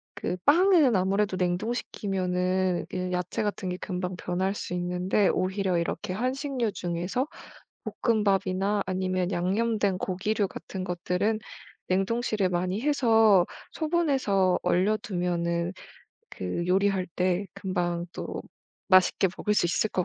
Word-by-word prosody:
그 - - -2
빵은 320 - +5
아무래도 195 +1 +1
냉동시키면은 185 -2 -1
그 185 0 -3
야채 180 +3 -2
같은 205 -2 -2
게 180 - -3
금방 180 -1 -4
변할 185 +2 -1
수 180 - -5
있는데 180 +3 +1
오히려 190 -1 0
이렇게 170 +2 -2
한식류 255 +1 -1
중에서 180 - -2 0.7
볶음밥이나 200 -3 +1
아니면 185 0 -1
양념된 200 +2 +1
고기류 200 +3 -1
같은 190 0 -7
것들은 180 +4 -1 0.5
냉동실에 200 +2 +1
많이 180 +4 -1
해서 225 -9 +4 0.3
소분해서 270 - +1
얼려두면은 175 -3 0 0.6
그 95 - -3
요리할 190 0 +2
때 185 +2 +1
금방 175 -3 -2
또 - - -5 0.5
맛있게 185 0 +5
먹을 210 - 0
수 175 - +3
있을 180 +5 +1
것 185 - 0
190 Hz, 275 characters per minute, -27 LUFS, 180-215 Hz, 0.7 s, 빵은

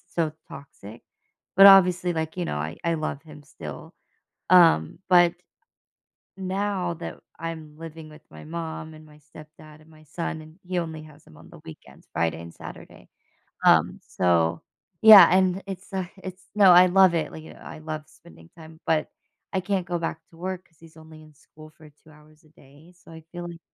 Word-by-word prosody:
so 160 -3 0 0.2
toxic. 115 -5 -12 0.5
But, 195 - +8
obviously, 180 -2 +6
like, 160 0 -4
you 180 - -2
know, 75 - -4
I 75 +4 -5
I 170 - 0
love 155 -2 -4
him 150 -2 -14
still. 140 - -10 0.6
Um, 165 - +5
but 175 -1 +5 1.0
now 190 -1 -2
that 170 - -8 0.2
I'm 160 -2 -7
living 160 -1 -10
with 155 0 -16
my - - -12
mom 160 -1 -7
and 155 0 -15
my 150 -1 -19
stepdad 155 +1 -16
and 155 - -21
my 155 -1 -19
son, 160 +1 -6
and 155 0 -15
he 180 0 -2
only 160 -2 -6
has 150 -1 -17
him 75 - -18
on 80 - -16
the - - -15
weekends- 80 - -14
Friday 85 0 -1
and 85 0 -11
Saturday. - - -13 0.6
Um, - - +4
so, 85 -2 +1 0.4
yeah, 220 -3 +11
and 185 +1 +2
it's, 195 0 -9
uh, 190 -2 -3
it's 185 0 -10
no, 200 -3 +6
I 180 +1 +8
love 185 -1 +4
it, 160 -2 -2
like, 155 - -10
I - - -11
love 155 -1 -7
spending 120 - -19
time, 160 -1 -14
but 155 -1 0 0.4
I 190 - 0
can't 190 -1 -2
go 175 0 -2
back 165 -1 -4
to 165 - -20
work 185 +1 -6
'cause 165 - -33
he's 165 -1 -18
only 160 0 -15
in 155 -1 -19
school 155 +2 -17
for 155 0 -18
2 150 +2 -24
hours 150 +1 -21
a 155 - -24
day. 145 +3 -20
So 175 - -19
I 160 0 -12
feel 175 0 -7
like 170 -1 -11
160 Hz, 190 wpm, -24 LUFS, 155-180 Hz, 1.0 s, yeah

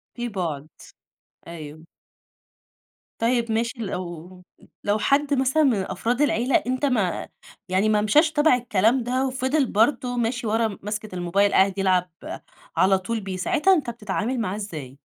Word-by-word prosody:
في 240 -1 -3
بُعد، 165 -8 -4 0.8
أيوه. 155 -2 -9 1.4
طيب 235 0 +1
ماشي، 230 +2 -1
لو 180 -3 -6 0.4
لو 205 +1 +1
حد 285 +5 +2
مثلًا 270 +3 +2
من 270 -4 +4 0.2
أفراد 235 +8 -1
العيلة 255 -3 +2
أنت 255 +3 0
ما 215 -10 0 0.4
يعني 190 +4 +2
ما 210 -1 +3
مشيش 295 +10 +4
تبع 305 -3 +4
الكلام 235 +1 +1
ده 255 +3 0
وفضل 260 +3 0
برضه 245 +2 +1
ماشي 235 0 -1
ورا 220 -1 0
ماسكة 210 -1 -5
الموبايل، 185 +3 +1
قاعد 190 0 +3
يلعب 185 -2 +2 0.7
على 190 +1 +4
طول 220 +5 -3
بيه، 190 -2 -5
ساعتها 355 - +3
أنت 300 -9 0
بتتعامل 230 +2 -3
معاه 205 -4 -2
إزاي؟ 155 -11 -7
220 Hz, 145 wpm, -24 LUFS, 190-255 Hz, 1.4 s, من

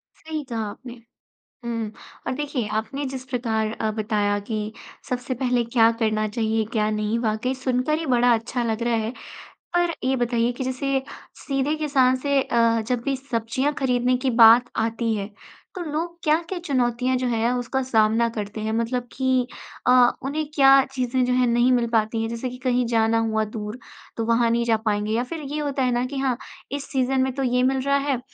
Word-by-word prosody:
सही 315 -1 -5
कहा 225 -1 -2
आपने। 240 +4 -10 0.7
हुँ 230 -2 -3 0.4
और - - 0
देखिए, 280 -6 -2
आपने 220 +7 -3
जिस 260 -1 -5
प्रकार 225 -4 -1
अ, 220 - 0
बताया 210 -1 0
कि 215 0 -3 0.4
सबसे 250 +1 -2
पहले 250 -1 +1
क्या 230 -1 +4
करना 215 -1 +1
चाहिए, 220 0 0
क्या 215 -1 +1
नहीं, 215 +1 -1
वाक़ई 230 +2 -1
सुनकर 260 +3 0
ही 325 - -4
बड़ा 245 -2 +4
अच्छा 235 +2 -1
लग 225 0 -1
रहा 235 -1 +1
है। 225 - -3 0.6
पर 350 -1 +2
ये 265 +1 +2
बताइए 240 -1 +1
कि 255 - -4
जैसे 265 +1 -1 0.3
सीधे 275 +1 -1
किसान 275 -4 +2
से 280 +1 +1
अ, 230 -2 +2
जब 250 -2 0
भी 275 - +1
सब्ज़ियाँ 260 +2 -1
खरीदने 250 -1 +2
की 260 +1 -1
बात 235 0 +7 0.2
आती 230 0 -1
है, 200 -1 -4 0.5
तो 365 - -4
लोग 335 +2 -3
क्या-क्या 330 +4 +1
चुनौतियाँ 250 -2 +1
जो 255 - -1
हैं, 230 0 +1
उसका 250 +2 -1
सामना 225 -1 +3
करते 215 -1 -5
हैं? 220 - -2
मतलब 240 +2 -1
कि 260 -1 +1 0.4
अ, - - +6 0.3
उन्हें 300 +3 -2
क्या 270 -1 +7 0.2
चीज़ें 255 -1 0
जो 250 - +1
हैं, 250 0 +3
नहीं 240 +2 +3
मिल 240 -2 +2
पाती 220 +1 +1
हैं? 225 - -1
जैसे 235 +2 -3
कि 250 - -9
कहीं 250 -1 +2
जाना 225 -1 +2
हुआ 220 0 +1
दूर, 210 +3 -5 0.4
तो 225 - -1
वहाँ 230 0 +3
नहीं 235 +1 +2
जा 225 -1 +3
पाएँगे 210 0 0
या 235 +2 +1
फ़िर 320 +5 -6
ये 305 - -1
होता 285 -2 -1
है 250 - +2
ना 245 +1 0
कि 275 +2 -5
हाँ, 260 -3 0 0.3
इस 280 0 -4
सीज़न 260 0 +1
में 260 0 +1
तो 275 - -1
ये 250 0 +2
मिल 265 - -1
रहा 280 +1 +2
है, 280 -2 -1
245 Hz, 195 wpm, -23 LUFS, 225-265 Hz, 0.7 s, बात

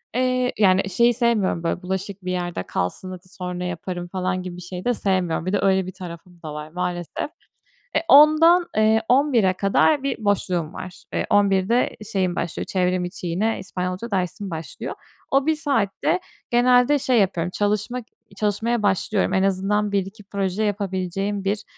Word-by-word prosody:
Eee, 255 0 +1
yani, 195 -1 +4
şeyi 235 +5 +3
sevmiyorum, 230 -8 +1
böyle, 170 +1 -1
bulaşık 190 +1 -4
bir 185 - -1
yerde 175 - -3
kalsın, 90 - -3
hadi 185 0 -10
sonra 180 -1 -5
yaparım 175 0 -4
falan 185 0 -2
gibi 180 -1 -6
bir - - -9
şey 180 +1 -7
de 245 - +3
sevmiyorum. 185 -5 0
Bir 185 - -2
de, 205 - +2
öyle 190 -1 +3
bir 185 - -6
tarafım 175 -1 -10
da 155 -1 -6
var 150 0 -7
maalesef. 180 - -3 0.7
E, - - +5
10.00'dan 325 +4 +7
eee, 220 +1 +4
11.00'e 250 -8 +4
kadar 235 +9 +2
bir 275 -2 -1
boşluğum 180 -5 0
var. 185 -1 -9
Eee, - - 0
11.00'de 195 -2 +3
de 240 +2 +1
şeyim 185 -3 0
başlıyor, 170 - -3
çevrim 180 -1 0
içi, 175 0 -6
yine 205 +7 0
İspanyolca 185 +4 -4
dersim 190 +1 -2
başlıyor. 160 -2 -6 0.4
O 275 +1 +3
1 315 - +2
saatte 275 - 0 0.3
genelde 250 +3 +4
şey 255 -3 +2
yapıyorum, 180 -3 0
çalışmak 210 +4 -1 0.3
çalışmaya 220 +2 0
başlıyorum. 200 +1 +1
En 190 - +3
azından 195 +2 +1
1-2 200 +2 -2
proje 195 +1 -2
yapabileceğim 195 -1 -2
bir, 205 +2 -1
195 Hz, 165 wpm, -23 LUFS, 180-220 Hz, 0.7 s, 10.00'dan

